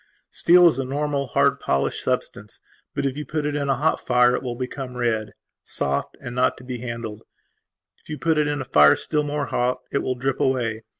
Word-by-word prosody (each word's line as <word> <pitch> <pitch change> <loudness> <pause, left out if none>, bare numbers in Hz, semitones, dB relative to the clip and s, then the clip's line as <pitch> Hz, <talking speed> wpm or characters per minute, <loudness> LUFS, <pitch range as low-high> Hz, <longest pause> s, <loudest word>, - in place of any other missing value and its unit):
Steel 175 +1 +6
is 155 - +2
a - - 0
normal, 140 +1 -2
hard, 140 +1 +2
polished 70 0 -1
substance. 105 0 -3 0.4
But, - - -1
if 135 -1 -1
you 150 - -4
put 150 +2 -3
it 145 0 -1
in 140 -1 -1
a 135 - +3
hot 155 +4 +1
fire 125 0 +3
it - - -3
will 125 -2 -4
become 125 0 -6
red, 110 -3 -1 0.3
soft, 70 0 -2
and 120 - -7
not 125 +1 +1
to - - -13
be 125 -1 -6
handled. 115 -3 -6 0.8
If - - -23
you 150 - -4
put 160 -1 +1
it 150 - +2
in 145 -1 -1
a - - -5
fire 75 -10 +6
still 150 -2 -1
more 145 0 -2
hot 125 +1 0
it 140 - +1
will 130 - -2
drip 135 +1 -2
away. 120 -4 0
130 Hz, 220 wpm, -23 LUFS, 120-145 Hz, 0.8 s, Steel